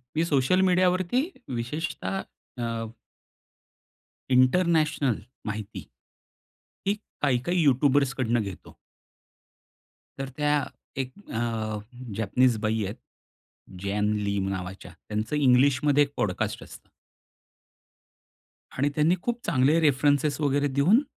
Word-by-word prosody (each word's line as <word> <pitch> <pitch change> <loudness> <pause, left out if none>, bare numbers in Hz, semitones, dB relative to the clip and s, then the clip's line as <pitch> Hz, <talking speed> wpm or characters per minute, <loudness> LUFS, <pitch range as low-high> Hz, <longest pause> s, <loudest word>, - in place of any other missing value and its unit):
मी 160 - +2
social 145 +4 +2
मीडियावरती 185 +6 +2 0.4
विशेषतः 155 +9 -3 0.4
अ 115 -1 -3 1.4
international 150 - +3 0.3
माहिती, 105 0 -5 1.0
ही 200 - +3 0.3
काही 140 -4 +3
काही 175 +5 0
यूट्यूबर्सकडून 135 -3 +2
घेतो. 100 -4 -8 1.4
तर 135 0 -3
त्या 150 -1 +2 0.4
एक 130 -1 -6 0.2
अ, 110 -2 -2 0.4
जॅपनीस 120 +3 +2
बाई 110 0 0
आहेत, 100 +4 -5 0.9
जॅन 105 +1 0 0.2
ली 100 0 0
नावाच्या. 95 0 -6 0.2
त्यांचं 110 +7 -2
इंग्लिश 130 -1 +4
मध्ये 145 0 +5
एक 145 0 -6
पॉडकास्ट 95 -4 -1
असतं. - - -14 1.9
आणि 140 +3 +2
त्यांनी 155 +4 +3
खूप 240 +3 -2
चांगले 140 +5 +3
रेफरंसेस 145 0 +2
वगैरे 145 0 +2
देऊन 145 - +4
135 Hz, 100 wpm, -26 LUFS, 115-150 Hz, 1.9 s, मध्ये